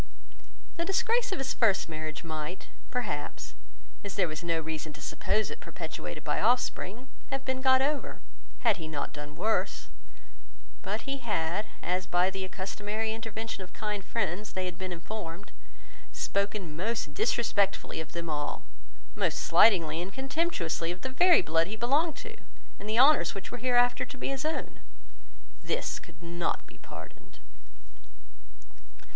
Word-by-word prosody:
The 335 Hz, -, +1 dB
disgrace 470 Hz, +6 st, +2 dB
of -, -, 0 dB
his 270 Hz, -2 st, -1 dB
first 215 Hz, -5 st, +3 dB
marriage 155 Hz, -2 st, -4 dB
might, 155 Hz, +2 st, -5 dB, 0.2 s
perhaps, 145 Hz, -, -3 dB, 0.5 s
as 200 Hz, -2 st, -5 dB
there 185 Hz, -3 st, +3 dB
was 155 Hz, +1 st, -5 dB
no 165 Hz, -1 st, +1 dB
reason 155 Hz, -1 st, -4 dB
to 150 Hz, -, -10 dB
suppose 210 Hz, +7 st, 0 dB
it -, -, -6 dB
perpetuated -, -, -6 dB
by -, -, 0 dB
offspring, 245 Hz, -1 st, +1 dB, 0.2 s
have 270 Hz, 0 st, -2 dB
been 260 Hz, 0 st, -1 dB
got 260 Hz, 0 st, +6 dB
over, 290 Hz, +1 st, -1 dB, 0.4 s
had 225 Hz, -6 st, +4 dB
he 160 Hz, -2 st, -5 dB
not 150 Hz, -2 st, -3 dB
done 150 Hz, 0 st, -7 dB
worse; 220 Hz, +1 st, 0 dB, 0.9 s
but -, -, -2 dB
he 275 Hz, 0 st, -3 dB
had, 210 Hz, -3 st, 0 dB, 0.2 s
as 180 Hz, +1 st, 0 dB
by 180 Hz, +2 st, +3 dB
the 190 Hz, 0 st, -3 dB
accustomary 205 Hz, +4 st, -2 dB
intervention 225 Hz, -1 st, -4 dB
of 180 Hz, -, -13 dB
kind 210 Hz, -3 st, -2 dB
friends, 205 Hz, -1 st, -1 dB
they 185 Hz, 0 st, -1 dB
had 180 Hz, -2 st, -3 dB
been 185 Hz, +1 st, -4 dB
informed, 175 Hz, +1 st, -6 dB, 0.6 s
spoken 200 Hz, -5 st, -1 dB
most 185 Hz, -3 st, -1 dB
disrespectfully 210 Hz, -6 st, +1 dB
of 160 Hz, -, -9 dB
them 170 Hz, 0 st, -3 dB
all, 150 Hz, -2 st, -2 dB, 0.5 s
most -, -, +1 dB
slightingly 170 Hz, -6 st, +5 dB
and 190 Hz, +3 st, -5 dB
contemptuously 265 Hz, -, 0 dB
of 180 Hz, -, -6 dB
the 260 Hz, -, -2 dB
very 350 Hz, +7 st, +6 dB
blood 165 Hz, +1 st, +3 dB
he 210 Hz, -, -3 dB
belonged 280 Hz, +8 st, +2 dB
to, -, -, -8 dB, 0.4 s
and 210 Hz, -, -6 dB
the 220 Hz, -, +1 dB
honours 250 Hz, -, +6 dB
which 195 Hz, 0 st, -6 dB
were 245 Hz, -, -4 dB
hereafter 245 Hz, 0 st, +4 dB
to 275 Hz, -, -7 dB
be -, -, -2 dB
his 275 Hz, +1 st, -2 dB
own. 315 Hz, -, -2 dB, 0.8 s
This -, -, -1 dB
could 165 Hz, 0 st, -15 dB
not 170 Hz, 0 st, -1 dB
be -, -, -16 dB
pardoned. -, -, -11 dB
200 Hz, 155 wpm, -30 LUFS, 170-245 Hz, 0.9 s, got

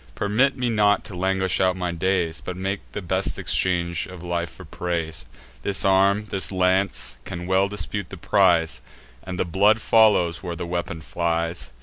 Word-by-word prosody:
Permit 125 Hz, +7 st, +1 dB
me 125 Hz, -1 st, 0 dB
not 105 Hz, -3 st, +3 dB
to 100 Hz, -, -9 dB
languish 95 Hz, +1 st, 0 dB
out 95 Hz, -1 st, +3 dB
my 90 Hz, -1 st, -2 dB
days, 85 Hz, -3 st, -1 dB
But 90 Hz, +1 st, -5 dB
make 95 Hz, +1 st, -2 dB
the 105 Hz, -, -5 dB
best 95 Hz, +2 st, -1 dB
exchange 85 Hz, -2 st, 0 dB
of 90 Hz, -2 st, -10 dB
life 85 Hz, -1 st, -2 dB
for -, -, -13 dB
praise. 85 Hz, -2 st, -4 dB, 0.3 s
This 100 Hz, +7 st, 0 dB
arm, 100 Hz, +2 st, +3 dB
this 95 Hz, 0 st, 0 dB
lance, 95 Hz, +1 st, +1 dB
can 90 Hz, 0 st, -6 dB
well 95 Hz, +1 st, +2 dB
dispute 100 Hz, -1 st, -3 dB
the 95 Hz, -, -8 dB
prize; 85 Hz, -5 st, +2 dB, 0.4 s
And 90 Hz, -1 st, -6 dB
the -, -, +1 dB
blood 100 Hz, +5 st, +3 dB
follows, 105 Hz, -8 st, +4 dB
where 90 Hz, -2 st, -5 dB
the 85 Hz, -, -5 dB
weapon 85 Hz, -1 st, -4 dB
flies. 85 Hz, -4 st, -2 dB
95 Hz, 175 wpm, -23 LUFS, 85-100 Hz, 0.4 s, follows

